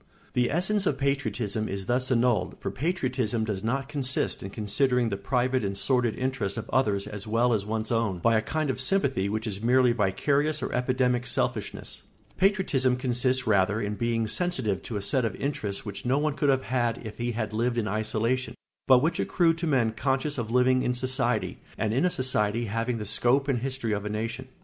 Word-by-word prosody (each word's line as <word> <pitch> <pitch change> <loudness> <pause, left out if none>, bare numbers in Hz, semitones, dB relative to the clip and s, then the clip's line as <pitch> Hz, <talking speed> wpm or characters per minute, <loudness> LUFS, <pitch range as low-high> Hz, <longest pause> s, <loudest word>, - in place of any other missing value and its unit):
] - - -31
The 125 -1 +2
essence 190 +5 +1
of 135 - +1
patriotism 125 -6 -1
is 95 0 -4
thus 125 +4 +1
annulled, 120 -6 +2
for - - -3
patriotism 130 - -1
does 105 -3 -3
not 135 +4 -1
consist 135 -3 0
in 95 - -6
considering 120 +4 +1
the 100 - -2
private 125 +5 0
and 100 -1 -2
sordid 120 +1 +1
interests 130 -6 -2
of 115 - -5
others 105 -7 +1
as 105 -1 -7
well 115 +3 +2
as 105 -2 -1
one's 110 +1 -2
own, 115 -5 +1
by 115 +6 +2
a 110 - +3
kind 150 +5 -1
of 130 - -3
sympathy 130 - +1
which 110 +2 -2
is 100 -2 -3
merely 125 +1 +4
vicarious 140 +8 +1
or - - -3
epidemic 125 -1 +1
selfishness; - - -2 0.3
patriotism 185 -10 +2
consists 125 0 0
rather 105 0 +2
in 105 -1 -2
being 115 +1 0
sensitive 125 - 0
to 110 - -5
a 100 - -4
set 130 +4 +2
of 110 -4 -1
interests 110 -9 -3
which 100 -2 -6
no 130 +2 +1
one 150 0 +1
could 145 0 0
have 130 -1 +2
had 120 -2 0
if 110 +1 -8
he 120 0 -1
had 110 -1 -3
lived 120 +2 0
in 110 -2 0
isolation, 110 +5 -1 0.3
but 130 0 +6
which 165 - 0
accrue 170 -3 +2
to 165 +1 -3
men 125 -7 +2
conscious 135 +4 -1
of 115 -2 -3
living 125 +1 +3
in 125 - 0
society, 125 -2 -1 0.2
and 110 -1 0
in 135 +8 +2
a - - +4
society 120 -6 0
having 115 +3 -2
the 105 - -5
scope 125 +6 +2
and 135 -4 +1
history 130 -2 -3
of 100 -1 -2
a 105 - -3
nation. 115 +4 -4
125 Hz, 205 wpm, -27 LUFS, 110-130 Hz, 0.3 s, but